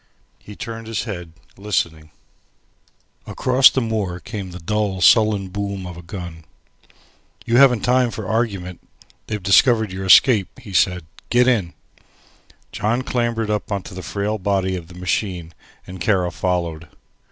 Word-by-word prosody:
He 105 - -12
turned 115 +1 -7
his 115 -2 -2
head, 90 -7 -7 0.2
listening. 85 -6 -2 1.2
Across 130 +1 +5
the 130 - -1
moor 105 -6 -2
came 100 -1 -7
the 90 - -9
dull 100 +2 -2
sullen 105 0 +4
boom 100 -1 -4
of 90 -1 -7
a 85 - -10
gun. 85 -2 -8 1.0
"You 120 +1 +2
haven't 125 -5 +6
time 125 0 +2
for - - -6
argument. 100 -6 -2 0.5
They 105 - -2
discovered 105 +2 +3
your 95 +1 -5
escape," 105 0 +5
he 100 - -11
said. 90 -1 +2 0.2
"Get 125 +1 +4
in." 105 -9 +1 1.0
John 120 +4 -1
clambered 120 -4 -1
up 105 +1 -3
into 100 -2 -4
the 95 - -7
frail 105 +3 -3
body 95 -1 0
of 85 -3 -7
the 90 - -14
machine 90 -2 -3 0.3
and 90 -1 -10
Kara 90 -2 +1
followed. 85 -3 -2
100 Hz, 145 wpm, -21 LUFS, 90-110 Hz, 1.2 s, haven't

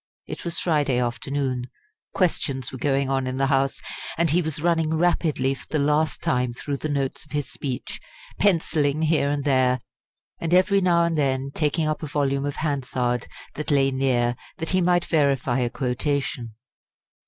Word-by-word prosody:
It - - -7
was 170 -1 -2
Friday 145 -6 +1
afternoon; 125 +1 -1 0.5
questions 135 - 0
were 130 - -7
going 135 0 +1
on 135 -1 0
in 130 0 -3
the 135 - +2
House; 135 0 +1 0.4
and 165 -2 +2
he 175 +3 +3
was 160 -2 -2
running 165 -2 +2
rapidly 155 -6 +1
for 135 - -11
the 155 - 0
last 150 +1 +1
time 125 -1 0
through 140 +2 -3
the 155 - -4
notes 140 -2 -2
of 150 - -14
his 145 -1 -2
speech, 130 -2 -5 0.4
pencilling 160 -6 +2
here 155 -3 +2
and 145 -1 -1
there, 130 -2 +3 0.6
and 170 +1 +1
every 195 +2 +4
now 170 -2 +4
and 165 -2 0
then 135 -1 0
taking 155 +1 0
up 155 - -1
a 155 - -4
volume 140 -1 0
of 145 - -3
Hansard 130 -5 -1 0.3
that 150 - -5
lay 135 -2 +3
near 125 -2 +1 0.2
that 165 - -3
he 185 -1 +3
might 175 0 +3
verify 140 -5 +2
a 120 -1 +1
quotation. 125 -2 -2
140 Hz, 175 wpm, -24 LUFS, 130-160 Hz, 0.6 s, every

